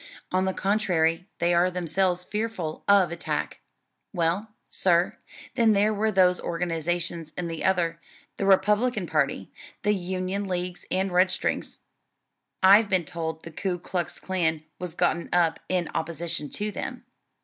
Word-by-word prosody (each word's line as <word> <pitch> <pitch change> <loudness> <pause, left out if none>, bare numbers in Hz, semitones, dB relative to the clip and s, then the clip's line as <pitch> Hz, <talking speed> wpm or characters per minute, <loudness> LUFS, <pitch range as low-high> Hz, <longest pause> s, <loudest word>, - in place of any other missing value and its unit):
On 185 +1 +2
the 190 - 0
contrary 180 -3 +1
they 175 +1 +2
are 175 +1 +4
themselves 180 0 0
fearful 210 -7 -3
of 195 -4 +5
attack." 170 - -3 0.5
"Well, 190 +5 -1
sir, 175 -1 +2 0.4
then 225 -3 +4
there 210 +2 +3
were 215 +1 +1
those 180 -2 +4
organizations 170 -1 -2
in 175 - -2
the 165 -1 -5
other 170 -3 +1 0.4
the 195 - -1
Republican 210 +3 +3
party; 140 - -1 0.3
the 210 - +3
Union 185 +1 -2
Leagues 180 -1 -3
and 190 +1 0
Redstrings. 180 +1 0 0.8
I've 200 +3 +7
been 185 -4 +2
told 160 -2 -5
the 165 - -8
Ku 180 +2 -2
Klux 175 0 -3
Klan 160 -4 0 0.2
was 180 -2 -6
gotten 170 +1 0
up 170 -2 +2
in 180 -2 0
opposition 165 -2 -3
to 210 0 -2
them." - - -6
180 Hz, 140 wpm, -26 LUFS, 170-195 Hz, 0.8 s, I've